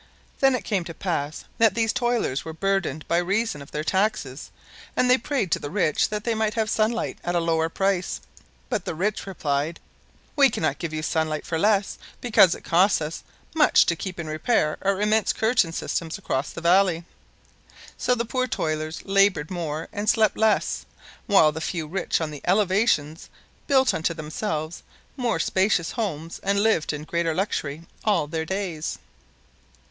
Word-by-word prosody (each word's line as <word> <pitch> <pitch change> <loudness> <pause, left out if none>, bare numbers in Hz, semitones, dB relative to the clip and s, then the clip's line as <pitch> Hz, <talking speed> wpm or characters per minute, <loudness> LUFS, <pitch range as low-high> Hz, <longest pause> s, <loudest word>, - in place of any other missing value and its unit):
Then 270 -1 +4
it 230 - -3
came 190 -2 -1
to 165 -2 -8
pass 155 -5 -3
that 225 -3 +4
these 225 -1 +1
toilers 240 - 0
were 160 - -6
burdened 190 -4 -1
by 170 - +2
reason 195 0 -1
of 140 - -11
their 150 - -3
taxes 175 -7 -1 0.5
and 250 - +3
they 250 +1 +6
prayed 245 - -1
to - - +2
the 145 - -6
rich 165 -4 +1
that 210 -1 -3
they 230 - 0
might 220 -1 -1
have 220 -2 0
sunlight 220 +1 0
at 175 0 -1
a - - +3
lower 165 -1 +1
price, 195 0 0 0.5
but - - -2
the - - -3
rich 200 +4 -2
replied: 155 -3 -2 0.6
"We 280 -2 +6
cannot 155 - -1
give 170 -3 -4
you 155 0 -4
sunlight 155 -2 -1
for 165 -2 -2
less 205 +1 +2 0.2
because 215 -7 +5
it - - -13
costs 185 +4 +3
us 155 +1 -5 0.3
much 310 -2 +5
to 170 - +1
keep 180 +1 -6
in 170 - -3
repair 155 +1 0
our 195 0 +1
immense 215 +1 +2
curtain 220 -6 +2
systems 165 +1 -3
across 140 -7 -2
the 170 - -8
valley." 175 -1 +3 0.9
So 250 - +1
the 235 0 -2
poor 255 +2 -1
toilers 155 -5 -3
labored 195 -6 +2
more 160 -3 -3
and 205 +1 -1
slept 220 -2 +3
less, 220 -1 +1 0.4
while 195 -7 +5
the 160 +1 -6
few 165 -1 -3
rich 175 +4 -1
on 160 -2 -3
the 145 - -8
elevations 185 -5 +1 0.4
built 265 -3 +4
unto 165 +1 -1
themselves 155 0 -4 0.3
more 245 -4 0
spacious 190 -3 +1
homes 165 -8 -4
and 200 +1 +1
lived 220 -8 +2
in 150 0 -5
greater 165 0 -1
luxury 160 -5 -2 0.2
all 210 -8 +2
their 160 +1 -3
days. 185 -4 -3
180 Hz, 175 wpm, -24 LUFS, 160-215 Hz, 0.9 s, they